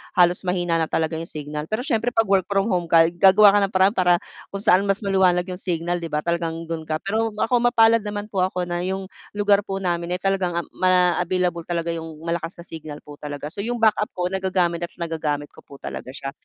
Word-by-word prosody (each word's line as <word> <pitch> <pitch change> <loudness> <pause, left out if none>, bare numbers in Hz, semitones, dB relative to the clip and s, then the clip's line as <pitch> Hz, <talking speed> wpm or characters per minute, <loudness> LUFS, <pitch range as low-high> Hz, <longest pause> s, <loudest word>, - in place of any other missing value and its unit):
halos 175 0 +4
mahina 175 -2 0
na 160 - 0
talaga 160 0 -1
yung 165 - -6
signal, 150 0 -6
pero 215 +6 -2
siyempre 245 -3 0
'pag 225 -1 +3
work 195 -2 +2
from 200 +1 +1
home 175 -2 0
ka, 165 0 +5
gagawa 195 +3 +6
ka - - +5
ng 195 - -15
paraan 190 +3 +4
para 180 -1 +4 0.4
kung 195 0 -5
saan 185 0 +5
mas 195 0 +1
maliwanag 185 -2 +3
yung 180 - -6
signal 175 -1 -1
'di 170 - -5
ba, 150 - 0
talagang 165 -1 -2
do'n 165 -1 -5
ka 155 - -1
pero 220 +3 0
ako 225 +3 +1
mapalad 230 -1 +5
naman 205 0 -5
po 195 - -2
ako 185 -1 -1
na 175 0 -2
yung 190 +1 -3 0.3
lugar 205 -1 +2
po 195 0 -4
namin 175 -1 -1
ay 180 - -3
talagang, 195 -3 0
um, - - -13
ma 180 -1 +3
available 180 -1 -1
talaga 170 -1 -2
yung 160 -2 -6
malakas 170 +1 -3
na - - -12
signal 155 -3 -8
po 145 -1 -12
talaga, 145 0 -6
so 200 - -5
yung 240 +1 -2
backup 215 -1 +3
ko 180 0 -2
nagagamit 185 -3 0
at 170 - -6
nagagamit 155 -4 -3
ko - - -17
po 140 - -13
talaga - - -7
siya, 135 0 -5
180 Hz, 230 wpm, -22 LUFS, 165-195 Hz, 0.4 s, gagawa